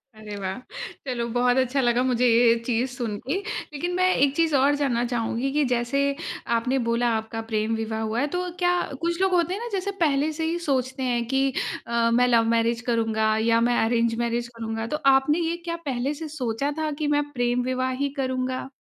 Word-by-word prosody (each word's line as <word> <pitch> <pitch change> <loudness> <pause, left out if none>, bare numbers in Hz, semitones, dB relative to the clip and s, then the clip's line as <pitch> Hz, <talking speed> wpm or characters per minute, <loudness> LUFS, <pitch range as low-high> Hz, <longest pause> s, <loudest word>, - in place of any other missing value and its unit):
अरे 215 -1 -8
वाह! 190 -1 -4 0.5
चलो 240 -2 -2
बहुत 245 +1 +3
अच्छा 260 +1 +2
लगा 240 -1 +2
मुझे 250 -1 +2
ये 230 0 +5
चीज़ 245 +2 0
सुनके। 240 - -3 0.4
लेकिन 345 +5 -3
मैं 370 0 +3
एक 280 +1 +2
चीज़ 325 -2 +2
और 280 +2 +4
जानना 250 -5 0
चाहूँगी 235 +3 -1
कि 295 0 +2
जैसे 240 +3 0 0.6
आपने 255 +3 0
बोला 235 +1 +2
आपका 220 +1 -4
प्रेम 215 +1 +1
विवाह 220 0 -3
हुआ 220 +2 -1
है 285 - +1
तो 360 0 -1
क्या 355 0 +3 0.3
कुछ 340 +1 -1
लोग 380 -1 +2
होते 350 0 +2
हैं 405 - -5
ना 475 - -4
जैसे 395 0 -1
पहले 295 -1 +2
से 320 - -1
ही 330 +2 -1
सोचते 260 -1 -1
हैं 240 -2 0
कि 270 0 +1 0.3
अ, 235 0 +1
मैं 245 +2 +4
लव 230 -2 +4
मैरिज 230 0 +1
करूँगा 220 -1 +1
या 230 0 +4
मैं 240 - +2
अरेंज 230 0 +1
मैरिज 235 0 -1
करूँगा। 225 0 -3
तो 300 - -2 0.2
आपने 270 +4 +3
ये 340 - -1
क्या 335 -1 -2
पहले 265 +2 -1
से 315 +1 -6
सोचा 250 +2 -1
था 310 -1 -1
कि 305 - -1
मैं 290 0 -1
प्रेम 245 -1 0
विवाह 255 0 0
ही - - +1
करूँगा? 255 0 -2
250 Hz, 205 wpm, -25 LUFS, 230-285 Hz, 0.6 s, ये